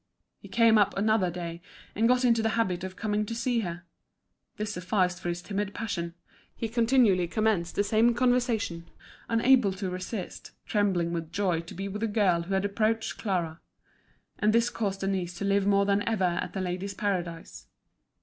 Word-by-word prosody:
He - - -12
came 230 -2 +4
up 200 -1 +2
another 210 -2 +2
day, 170 -1 -6 0.3
and 225 +3 +2
got 250 +1 +3
into 230 -2 +4
the 225 0 0
habit 185 -6 0
of 185 0 -6
coming 210 -1 -1
to 230 - -4
see 235 +1 0
her. 175 -4 -4 0.7
This 210 0 -3
sufficed 180 -1 0
for 175 - -3
his 175 0 -4
timid 200 0 -3
passion; 170 -7 -3 0.4
he 225 - -3
continually 230 -6 +3
commenced 210 -4 0
the 205 - +2
same 225 +3 +3
conversation, 240 -8 0 0.4
unable 230 -2 +4
to 190 -1 -4
resist, 185 +1 -6
trembling 185 -5 +1
with 165 -1 -4
joy 185 -3 0
to 165 0 -9
be 195 +2 -4
with 205 +2 -5
a 225 - +1
girl 200 -5 +2
who 190 +3 -2
had 190 +1 +1
approached 220 +2 -1
Clara. 170 -6 -2 0.8
And 215 +1 +3
this 235 +1 +3
caused 195 -3 -2
Denise 190 -3 -2
to 200 - -3
live 200 0 +2
more 200 0 +4
than 200 0 +2
ever 220 -4 0
at 175 -1 -1
The 190 - -3
Ladies' 185 +2 -3
Paradise. 175 -5 -3
200 Hz, 180 wpm, -28 LUFS, 180-225 Hz, 0.8 s, came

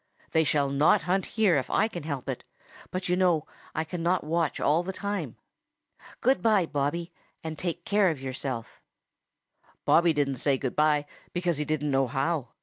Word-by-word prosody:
They 160 - +4
shall 145 -2 +1
not 145 +4 +4
hunt 185 +3 0
here 200 -8 +4
if 130 - -2
I 215 - +3
can 175 -6 -6
help 140 -4 -5
it, - - -4 0.5
but 185 0 -3
you 180 - +2
know 175 -4 +2 0.3
I 160 - 0
cannot 175 +2 -1
watch 160 0 0
all 155 +4 +3
the 180 +2 -4
time. 195 - -3 0.9
Good 260 +3 +3
by, 215 -5 +4
Bobby, 160 +4 -2 0.3
and 160 -1 -4
take 175 0 -4
care 205 -2 +3
of 155 -5 -3
yourself." 130 -3 -5 1.0
Bobby 170 0 +5
didn't 140 -3 0
say 135 +2 +2
good 130 -2 -3
by, 150 -1 +3 0.3
because 175 -3 0
he 150 - -1
didn't 150 -1 -1
know 135 -1 +2
how. 135 +2 -1
160 Hz, 175 wpm, -28 LUFS, 145-180 Hz, 1.0 s, Bobby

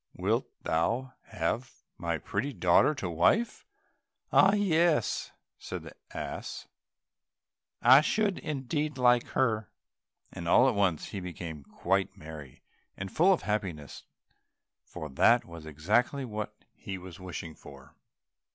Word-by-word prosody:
Wilt - - 0 0.2
thou 115 +11 0
have 105 +9 -3
my - - -2
pretty 135 +8 -3
daughter 90 - +4
to 95 - -4
wife?" 90 - +1 0.7
"Ah, 195 +1 +6
yes," 170 - +2 0.3
said - - -6
the - - -10 0.2
ass, - - -6 1.2
"I 130 +4 +9
should 200 +4 0
indeed 150 0 -3
like 125 -1 +4
her," 110 -5 +1 0.6
and 85 - -7
all 125 +9 +6
at 130 - +3
once 95 -7 0
he 100 - -5
became 85 -4 -7
quite 95 +7 -1
merry 75 -4 -10 0.3
and 95 0 -5
full 180 +5 +5
of 185 - +1
happiness, 95 -9 -3 0.8
for 80 - -8
that 115 - +4
was 85 -2 -10
exactly 110 - +1
what 105 -3 -5 0.2
he 95 - -7
was 90 -2 -11
wishing 90 -3 -6
for. 70 -2 -14
105 Hz, 125 wpm, -29 LUFS, 85-135 Hz, 1.2 s, I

